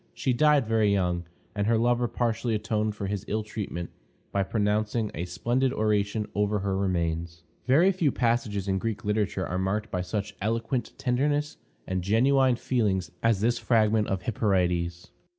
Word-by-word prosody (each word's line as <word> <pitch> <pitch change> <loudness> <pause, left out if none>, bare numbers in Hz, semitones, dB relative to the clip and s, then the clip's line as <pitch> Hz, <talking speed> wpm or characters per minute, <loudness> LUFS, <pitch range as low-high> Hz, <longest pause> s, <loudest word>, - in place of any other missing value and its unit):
She 130 - 0
died 150 0 +4
very 110 -2 +2
young, 90 -3 0 0.3
and 100 -1 -1
her 115 0 +3
lover 120 +1 +2
partially 115 -1 -1
atoned 110 0 -1
for 100 - -4
his 100 0 -3
ill 110 +1 -1
treatment 100 -5 -5 0.4
by 100 - +1
pronouncing 105 +2 0
a 85 +3 -3
splendid 120 +9 0
oration 105 -2 0
over 105 +1 +1
her 95 -1 -1
remains. 85 -3 -2 0.2
Very 160 +9 +5
few 175 -7 +1
passages 115 -5 0
in 95 -1 +1
Greek 110 0 -3
literature 105 -3 0
are 90 +2 -2
marked 105 +3 -1
by 90 - -1
such 100 +3 -4
eloquent 115 +4 -1
tenderness 145 +4 0 0.3
and 95 0 -2
genuine 130 +6 +3
feeling 110 -6 +1 0.2
as 115 -4 +2
this 120 +2 +2
fragment 110 -2 +2
of 95 -2 -2
Hyperides. 90 -5 0
105 Hz, 160 wpm, -27 LUFS, 95-120 Hz, 0.4 s, Very